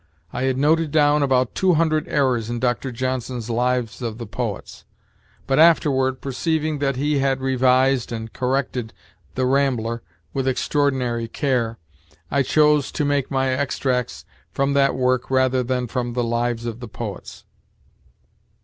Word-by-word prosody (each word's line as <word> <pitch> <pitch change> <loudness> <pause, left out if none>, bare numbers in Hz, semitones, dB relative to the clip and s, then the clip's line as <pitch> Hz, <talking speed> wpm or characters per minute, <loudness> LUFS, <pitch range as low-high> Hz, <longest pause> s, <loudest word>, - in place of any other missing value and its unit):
I 125 +2 -1
had 130 -1 0
noted 155 +3 +2
down 150 0 +3
about 130 -3 +2
two 185 -2 +2
hundred 155 -1 +1
errors 125 -6 +1
in 120 - -2
Dr. 125 +2 -1
Johnson's 125 -1 -3
'Lives 125 0 -1
of 115 -2 -4
the 115 - -6
Poets'; 115 -2 -5 0.6
but, 135 +2 +1
afterward 135 -5 +4
perceiving 155 +2 -1
that 140 -1 0
he 145 +2 0
had 135 -1 +1
revised 130 -1 +2
and 115 -1 -6
corrected 125 -3 -2 0.4
'The 130 - 0
Rambler' 125 -4 0 0.3
with 135 -1 -1
extraordinary 130 -3 0
care, 120 -3 -1 0.5
I 140 - +2
chose 150 0 +3
to 150 - -1
make 145 -2 0
my 135 -1 0
extracts 130 -2 -1 0.3
from 140 +8 0
that 140 -1 +3
work 130 -1 0
rather 130 -1 +2
than 125 0 -1
from 120 0 -3
the 120 0 0
'Lives 120 0 -1
of 115 0 -5
the 120 - -7
Poets.'" - - -8
130 Hz, 150 wpm, -22 LUFS, 120-140 Hz, 0.6 s, afterward